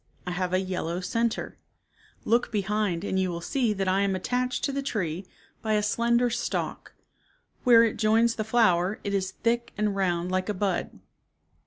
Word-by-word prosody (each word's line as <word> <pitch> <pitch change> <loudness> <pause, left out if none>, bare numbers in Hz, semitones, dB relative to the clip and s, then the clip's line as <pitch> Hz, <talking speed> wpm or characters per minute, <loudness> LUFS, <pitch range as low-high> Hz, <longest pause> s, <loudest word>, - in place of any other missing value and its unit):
I 180 - -3
have 180 0 -2
a 185 - +3
yellow 180 -2 -3
center. 230 +5 -2 0.7
Look 235 +2 +2
behind 205 -3 0
and 190 -2 -1
you 185 -1 +1
will 170 -1 -3
see 240 +6 0
that 195 -1 -2
I 190 +1 +2
am 200 -1 +1
attached 250 +6 -1
to 280 - +1
the 275 0 -2
tree 185 - -3 0.3
by 220 -1 0
a 210 0 +2
slender 235 +3 +2
stalk. 240 +1 -3 0.7
Where 235 -2 +8
it 230 - 0
joins 225 +2 +3
the 215 - -3
flower 210 -4 +2
it 200 - -2
is 190 -1 0
thick 235 +3 -1
and 210 -1 0
round 180 -2 0
like 185 +2 -1
a 210 - -1
bud." 190 -1 -2
205 Hz, 180 wpm, -27 LUFS, 185-230 Hz, 0.7 s, Where